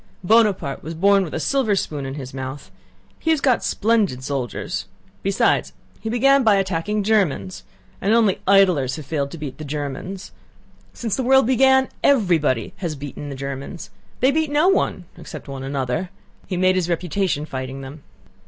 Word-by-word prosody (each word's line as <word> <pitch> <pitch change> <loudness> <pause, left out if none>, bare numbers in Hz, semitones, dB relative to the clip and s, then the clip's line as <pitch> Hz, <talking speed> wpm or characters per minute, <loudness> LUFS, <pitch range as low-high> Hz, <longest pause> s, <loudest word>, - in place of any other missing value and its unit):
"Buonaparte 200 -8 +2
was 160 +2 -6
born 195 +3 +4
with 165 - -6
a - - -1
silver 240 - +1
spoon 145 -7 -3
in 135 - -5
his 130 -3 -7
mouth. 130 +1 -7 0.5
He 320 - -2
has 320 -2 +3
got 260 -4 +2
splendid 210 - +1
soldiers. 135 -3 -3 0.4
Besides 195 0 +1 0.3
he 220 - -4
began 275 +4 +4
by 215 -3 +5
attacking 195 +2 -1
Germans. 140 - 0 0.4
And 200 - +1
only 220 -4 +3
idlers 180 -10 +4
have 155 - -8
failed 140 -1 -2
to 165 - -8
beat 145 -3 -7
the - - -5
Germans. 150 +6 -5 0.6
Since 225 -4 -3
the 260 - -1
world 265 +1 +5
began 265 +1 +4 0.2
everybody 165 - +2
has 170 -5 -3
beaten 145 +1 -7
the 140 - -6
Germans. 140 +4 -6 0.3
They 260 +2 +5
beat 315 +1 0
no 300 +5 +3
one—except 385 - -3
one 135 -1 -6
another. 135 +5 -2 0.4
He 185 - -3
made 185 +1 +4
his 175 -1 0
reputation 175 -2 -1
fighting 130 -1 -6
them." 140 +3 -9
175 Hz, 165 wpm, -22 LUFS, 140-220 Hz, 0.6 s, by